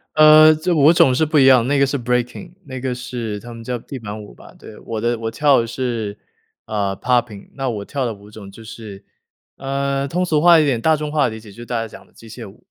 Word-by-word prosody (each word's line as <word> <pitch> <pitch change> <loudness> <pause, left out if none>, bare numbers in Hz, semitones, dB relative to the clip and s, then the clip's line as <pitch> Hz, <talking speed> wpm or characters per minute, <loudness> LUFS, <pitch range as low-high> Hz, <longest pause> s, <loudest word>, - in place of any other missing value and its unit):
呃， 155 0 +7
这 170 +3 -1
舞 150 +1 +5
种 135 -6 +4
是 155 +5 +1
不 155 0 0
一 135 - +5
样， 130 -3 +5
那 145 +1 +1
个 140 - +4
是 140 +1 -2
Breaking， 125 +8 -3
那 130 -2 -7
个 130 -1 -2
是 120 -4 -6
他 120 +2 -11
们 115 0 -10
叫 125 +1 -3
地 130 +3 -9
板 105 -1 -7
舞 105 - -13
吧。 - - -16
对， 105 - -13
我 110 -1 -6
的 120 +1 0
我 115 0 -4
跳 140 -1 +3
的 115 - -5
是， 115 -4 -4 0.5
呃， 100 -3 -2
Popping， 120 -5 -1
那 135 -1 -3
我 105 -4 -5
跳 140 -3 -3
的 115 - -3
舞 100 0 -16
种 100 -2 -11
就 115 - -14
是， 110 -3 -11 0.5
呃， 140 0 -2
通 180 +6 -1
俗 155 -4 +1
化 170 0 +6
一 155 - +2
点 125 -5 0
大 160 +3 +3
众 150 0 -5
化 150 -2 +2
的 110 - -8
理 - - -9
解 110 -2 -14
就 100 - -18
是 - - -9
大 120 -1 -3
家 115 - -4
讲 - - -14
的 - - -28
机 115 - -16
械 110 -2 -10
舞， - - -21
125 Hz, 340 characters per minute, -19 LUFS, 110-140 Hz, 0.5 s, 呃